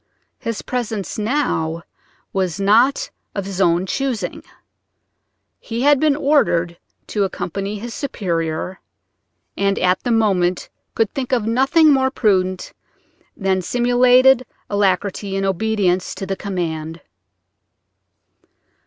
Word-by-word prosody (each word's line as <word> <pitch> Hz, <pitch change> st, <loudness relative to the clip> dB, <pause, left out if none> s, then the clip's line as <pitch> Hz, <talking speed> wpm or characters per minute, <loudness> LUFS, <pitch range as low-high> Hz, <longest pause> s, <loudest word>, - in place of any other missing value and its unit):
His 230 Hz, -2 st, -4 dB
presence 220 Hz, -6 st, -3 dB
now 190 Hz, -, -1 dB, 0.5 s
was 185 Hz, -2 st, -1 dB
not 225 Hz, +8 st, +3 dB, 0.2 s
of 200 Hz, -2 st, -3 dB
his 195 Hz, -1 st, -3 dB
own 175 Hz, 0 st, +3 dB
choosing: 230 Hz, -4 st, -3 dB, 1.2 s
he 235 Hz, +1 st, -4 dB
had 290 Hz, -1 st, +5 dB
been 300 Hz, -1 st, +3 dB
ordered 180 Hz, -, +1 dB, 0.3 s
to 205 Hz, -, -1 dB
accompany 195 Hz, +2 st, -3 dB
his 230 Hz, +3 st, -7 dB
superior, 175 Hz, -, -3 dB, 0.8 s
and 200 Hz, 0 st, 0 dB
at 180 Hz, 0 st, +2 dB
the -, -, -3 dB
moment 190 Hz, -6 st, +1 dB, 0.3 s
could 225 Hz, -3 st, 0 dB
think 265 Hz, -2 st, -4 dB
of 240 Hz, -5 st, +1 dB
nothing 270 Hz, +7 st, +4 dB
more 265 Hz, -1 st, +2 dB
prudent 185 Hz, -7 st, 0 dB, 0.6 s
than 190 Hz, -2 st, 0 dB
simulated 245 Hz, +4 st, +4 dB, 0.3 s
alacrity 200 Hz, 0 st, 0 dB
in 195 Hz, 0 st, -1 dB
obedience 195 Hz, -2 st, 0 dB
to 195 Hz, -, -5 dB
the 195 Hz, 0 st, -2 dB
command. 165 Hz, -5 st, -4 dB
200 Hz, 110 wpm, -20 LUFS, 185-245 Hz, 1.2 s, had